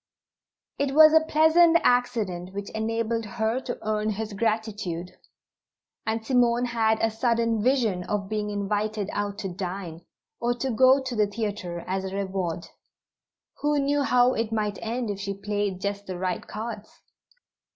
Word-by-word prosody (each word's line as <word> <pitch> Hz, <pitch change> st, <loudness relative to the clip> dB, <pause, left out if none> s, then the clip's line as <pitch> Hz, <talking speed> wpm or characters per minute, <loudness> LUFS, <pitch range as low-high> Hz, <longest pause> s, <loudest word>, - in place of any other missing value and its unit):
It 280 Hz, -1 st, 0 dB
was 310 Hz, 0 st, +9 dB
a 320 Hz, -, +8 dB
pleasant 320 Hz, +2 st, +5 dB
accident 200 Hz, -7 st, 0 dB
which 200 Hz, 0 st, -5 dB
enabled 225 Hz, +1 st, -1 dB
her 220 Hz, +3 st, +1 dB
to 245 Hz, -, -5 dB
earn 215 Hz, 0 st, 0 dB
his 215 Hz, 0 st, -3 dB
gratitude, 210 Hz, -5 st, -2 dB, 1.0 s
and 220 Hz, 0 st, -1 dB
Simone 245 Hz, -1 st, +3 dB
had 225 Hz, -2 st, +1 dB
a 225 Hz, -, +1 dB
sudden 230 Hz, -1 st, +1 dB
vision 225 Hz, -7 st, +1 dB
of 205 Hz, -2 st, -2 dB
being 210 Hz, 0 st, -2 dB
invited 205 Hz, 0 st, -2 dB
out 205 Hz, -1 st, -2 dB
to 200 Hz, -, -4 dB
dine, 180 Hz, -2 st, -6 dB, 0.4 s
or 240 Hz, +1 st, 0 dB
go 260 Hz, +2 st, +4 dB
to 255 Hz, -2 st, -4 dB
the 210 Hz, -1 st, +3 dB
theatre, 200 Hz, -5 st, -4 dB
as 190 Hz, +1 st, -2 dB
a 190 Hz, 0 st, -5 dB
reward. 185 Hz, -4 st, -2 dB, 0.9 s
Who 295 Hz, 0 st, +1 dB
knew 285 Hz, +1 st, +1 dB
how 250 Hz, -2 st, +4 dB
it 225 Hz, -1 st, -2 dB
might 210 Hz, -2 st, -1 dB
end 230 Hz, 0 st, -2 dB
if 200 Hz, -, -5 dB
she 200 Hz, 0 st, -3 dB
played 205 Hz, -2 st, -2 dB
just 200 Hz, 0 st, -3 dB
the 185 Hz, -1 st, -4 dB
right 180 Hz, 0 st, -3 dB
cards? 215 Hz, 0 st, -7 dB
215 Hz, 150 wpm, -26 LUFS, 200-240 Hz, 1.0 s, was